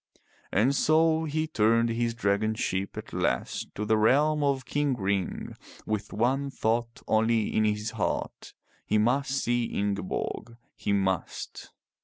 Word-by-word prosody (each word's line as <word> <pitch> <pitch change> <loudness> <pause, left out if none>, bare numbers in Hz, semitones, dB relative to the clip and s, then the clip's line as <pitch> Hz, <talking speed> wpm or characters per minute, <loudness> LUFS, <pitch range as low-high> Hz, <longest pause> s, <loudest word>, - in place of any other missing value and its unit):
And 120 +8 +3
so 160 +2 +3
he 155 +1 -1
turned 115 -4 +2
his 115 0 -1
dragon 110 0 +1
ship 95 -2 -2
at - - -8
last 60 - -1
to 105 - -3
the 110 +1 +3
realm 150 +7 +3
of 135 -2 +1
King 145 -2 0
Ring, 100 -3 -2 0.3
with 110 -1 -3
one 130 +6 +1
thought 115 -2 -1
only 110 0 +2
in 110 - +3
his 105 +1 -1
heart. - - -3 0.3
He 105 - +1
must 125 +6 +2
see 120 -3 0
Ingeborg. 100 +3 -3 0.2
He - - -2
must. 95 -3 -2
115 Hz, 140 wpm, -28 LUFS, 105-135 Hz, 0.3 s, And